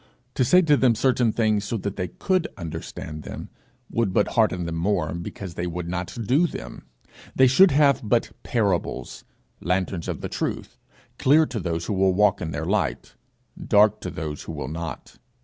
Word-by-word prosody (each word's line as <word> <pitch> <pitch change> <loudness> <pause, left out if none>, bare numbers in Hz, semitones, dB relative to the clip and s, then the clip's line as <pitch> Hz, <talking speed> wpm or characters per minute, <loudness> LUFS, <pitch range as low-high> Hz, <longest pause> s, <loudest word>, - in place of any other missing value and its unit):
To 130 - +1
say 180 +9 +5
to 150 -3 +4
them 130 -4 +3
certain 125 -1 +2
things 110 -2 +1
so 115 +2 -2
that 100 -1 -4
they 90 -2 -2
could 185 - -1
understand 80 -2 -7
them, - - -8 0.4
would 115 -5 0
but - - +2
harden 100 -7 +1
them 85 - -4
more, 85 -3 0
because 85 +1 -7
they 90 +1 -3
would 85 0 -4
not 90 +3 -4
do 145 - +3
them; - - -9 0.5
they 130 - +6
should 155 +10 +6
have 140 -2 +4
but 115 +2 +1
parables 100 -8 -2 0.3
lanterns 90 -1 -1
of - - -4
the - - -3
truth, - - -4 0.4
clear 150 +4 +5
to 120 - -4
those 85 -2 -3
who - - -2
will 95 -1 +2
walk 100 0 +3
in 80 - -3
their 75 0 -4
light, 95 - -1 0.5
dark 105 0 +4
to - - -4
those 75 -1 -5
who 80 - -7
will 75 -3 -5
not. 85 +1 -7
100 Hz, 185 wpm, -24 LUFS, 85-120 Hz, 0.5 s, they